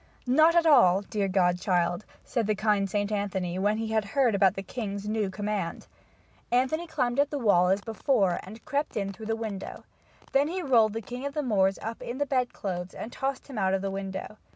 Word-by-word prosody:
"Not 310 +7 +5
at 340 -1 +4
all, 220 - +6
dear 205 0 -2
godchild," 180 0 +1 0.2
said 235 -5 -1
the 215 - +1
kind 205 -2 +1
St. 205 +1 -1
Anthony 190 -3 -2
when 205 +2 +1
he 225 0 -3
had 220 -1 +1
heard 240 +3 +1
about 195 -2 +3
the 195 - -4
king's 205 -2 -5
new 215 -2 0
command. 200 -2 -3 0.7
Anthony 265 +8 +1
climbed 250 -5 -1
quietly - - +6
up 290 - 0
the 280 -5 -4
wall 180 -3 +5
as 195 +2 +2
before 215 -4 +1
and 220 +6 -12
crept 290 -4 -2
in 200 -1 -2
through 215 +3 -9
the 225 - 0
window. 220 -4 -6 0.5
Then 280 +2 +3
he 365 +3 -3
rolled 230 -7 +4
the 225 0 -4
king 245 +5 -7
of 285 - -8
the 300 - 0
Moors 195 -6 +2
up 225 +1 -5
in 240 - -5
the 285 - 0
bedclothes 200 -9 -2
and 225 - -6
tossed 270 0 -3
him 265 -6 -6
out 190 -1 +2
of 195 - -3
the 195 - -2
window. 195 +2 -5
215 Hz, 215 wpm, -27 LUFS, 195-250 Hz, 0.7 s, all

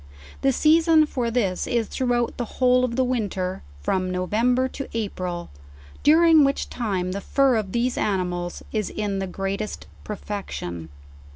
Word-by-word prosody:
The 270 - +3
season 320 +3 +5
for 250 -5 -2
this 210 -6 0
is 235 -2 +1
throughout 245 -2 -1
the 245 - -1
whole 250 0 +4
of 240 -2 -1
the 260 - +2
winter, 200 -7 -2 0.2
from 185 - 0
November 230 +8 +1
to 275 - -6
April; 180 - -4 0.5
during 320 0 +6
which 275 0 0
time 190 -6 -2
the 200 +2 -4
fur 275 +3 +3
of 210 -4 -1
these 240 +3 0
animals 180 -3 -2
is 215 -3 -1
in 205 -2 -2
the 190 - -2
greatest 195 +3 -4 0.2
perfection. 190 - -5
220 Hz, 150 wpm, -24 LUFS, 185-255 Hz, 0.5 s, during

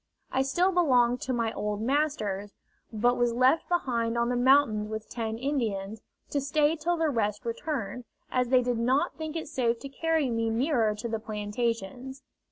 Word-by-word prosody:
I 265 - +2
still 345 +8 +2
belonged 250 -9 +3
to 260 - -3
my 230 -3 0
old 210 0 -2
masters, 220 -6 -1 0.4
but 240 +3 +2
was 240 -1 +2
left 255 +6 +3
behind 235 -9 0
on 235 0 +1
the 250 - 0
mountains 245 -4 +3
with 220 0 -5
ten 225 -2 -3
Indians, 220 -6 -2 0.3
to 285 - 0
stay 295 +3 +2
till 340 +2 -1
the 320 -1 +1
rest 215 -1 -1
returned, 235 -2 -4 0.3
as 250 -1 +1
they 250 0 +4
did 245 -1 -1
not 255 +4 +1
think 315 0 -6
it 325 - -4
safe 240 -5 0
to 275 - -8
carry 320 +1 0
me 230 0 0
nearer 230 -2 +1
to 220 +3 -5
the 225 -1 -2
plantations. 230 +4 -4
245 Hz, 175 wpm, -28 LUFS, 225-280 Hz, 0.4 s, they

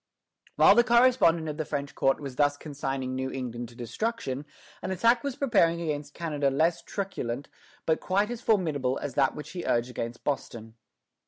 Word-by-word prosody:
While - - +7
the 240 +3 +5
correspondent 235 -9 +4
of 150 -1 -4
the 155 - -1
French 140 -2 -4
court 135 0 +2
was 135 -3 -7
thus 145 0 +2
consigning 135 -3 -4
New 130 0 -2
England 120 -3 -5
to 120 - -16
destruction, 140 - -3 0.4
an - - -4
attack 230 +5 +3
was 280 -3 -2
preparing 170 -11 +3
against 150 -3 -4
Canada 150 -5 0
less 160 +5 +1
truculent 140 - -4 0.4
but 160 - +2
quite 200 +4 0
as 240 -1 -5
formidable 150 - +1
as 145 -3 -5
that 135 0 +2
which 150 - -8
he 175 -1 -5
urged 120 +1 0
against 120 0 -5
Boston. 115 -5 -4
145 Hz, 175 wpm, -28 LUFS, 130-185 Hz, 0.4 s, While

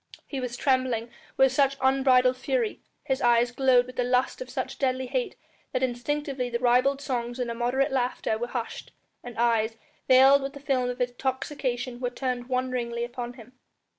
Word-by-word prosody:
He 275 - -5
was 245 -1 -4
trembling 255 -4 0 0.3
with 265 -1 +5
such 275 +1 +2
unbridled 260 -1 +4
fury, 445 - -1 0.2
his 265 -1 -1
eyes 240 0 +4
glowed 250 -1 +4
with 255 0 -12
the 250 - +2
lust 250 - 0
of - - -6
such - - -4
deadly 260 -1 0
hate 255 0 -2 0.4
that 255 - 0
instinctively 260 +1 -2
the 235 - -1
ribald 255 +3 +3
songs 245 -3 -3
and 245 -2 -2
immoderate 245 +4 0
laughter 250 -4 0
were 240 - -2
hushed, 240 -2 -5 0.3
and 245 -1 -9
eyes, 225 -1 +1 0.3
veiled 270 +2 +7
with 275 0 -4
the 280 - -9
film 260 -3 0
of 250 +1 -5
intoxication 250 0 -2
were 250 -1 -1
turned 245 -1 -3
wonderingly 250 -2 -1
upon 240 0 -5
him. 245 0 -14
255 Hz, 170 wpm, -27 LUFS, 245-265 Hz, 0.4 s, veiled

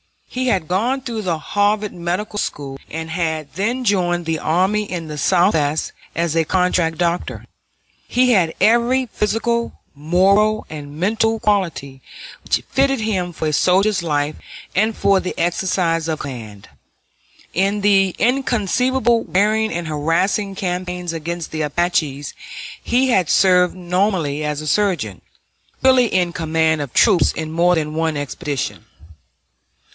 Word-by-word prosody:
He 255 0 -3
had 190 -9 +1
gone 240 +9 0
through 230 -4 -4
the 175 -4 -1
Harvard 205 +5 0
Medical 180 +5 -3
School, 135 -6 -4
and 160 +1 -5
had 160 -4 -2
then 230 - -1
joined 175 -5 +1
the 160 -1 -1
army 190 +6 +1
in 170 -3 -4
the 150 - -6
Southwest 155 -1 +2 0.2
as 170 -1 -1
a 165 - +3
contract 180 -2 +1
doctor. 175 0 -2 0.6
He 250 0 +3
had 180 -7 +2
every 240 +3 +3
physical, 235 +2 -1
moral, 195 +8 +2
and 145 -1 -8
mental 225 +4 +1
quality 175 - -1 0.4
which - - 0
fitted 270 -2 +2
him 190 -5 -1
for 160 -2 -2
a - - -3
soldier's 190 +5 +3
life 150 -2 -1 0.4
and 215 +4 +1
for 195 -1 +3
the 185 - -5
exercise 170 -2 0
of 160 -1 -2
command. 110 - -8 0.8
In 195 +3 +1
the 195 -2 +3
inconceivably 245 -1 +1
wearing 215 +3 +2
and 170 -1 -3
harassing 170 +7 0
campaigns 180 -2 -3
against 165 +1 -5
the 155 - -3
Apaches 150 -2 -1 0.5
he 255 +2 +1
had 185 -9 +2
served 180 -2 +4
nominally 180 -5 -1
as 150 0 -2
a 155 - -7
surgeon, 155 - 0 0.6
really 260 -2 +5
in 180 -4 0
command 160 -3 +1
of 140 -4 -5
troops, 205 -6 +4
on 160 -1 -4
more 175 +2 +3
than 155 -2 -2
one 160 -1 -1
expedition. 145 -1 -4
180 Hz, 140 wpm, -19 LUFS, 160-210 Hz, 0.8 s, really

